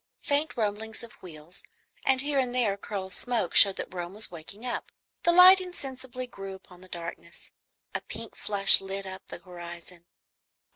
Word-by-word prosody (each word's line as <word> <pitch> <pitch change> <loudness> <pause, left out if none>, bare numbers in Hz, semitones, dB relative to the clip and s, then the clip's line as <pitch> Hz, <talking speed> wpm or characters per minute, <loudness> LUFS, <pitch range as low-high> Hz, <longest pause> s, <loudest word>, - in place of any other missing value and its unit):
Faint 290 0 -1
rumblings 220 +1 -3
of 235 - -10
wheels 165 -1 -9 0.4
and 265 -1 +2
here 285 0 -1
and 250 -2 -2
there 235 -5 +1
a - - -9
curl 200 -2 -6
of 190 - -9
smoke 235 -8 -1
showed 195 -1 +7
that - - -7
Rome 175 +1 -7
was 215 - +2
waking 180 +7 -9
up. 245 - -5 0.3
The 345 - +2
light 365 +2 +8
insensibly 260 -8 -8
grew 195 -5 -10
upon 180 -1 -18
the 185 - -15
darkness. 170 -1 -9 0.4
A - - -4
pink - - -9
flush 200 -1 +8
lit 195 0 -6
up 190 0 -10
the - - -8
horizon. 175 0 -12
200 Hz, 180 wpm, -26 LUFS, 180-255 Hz, 0.4 s, light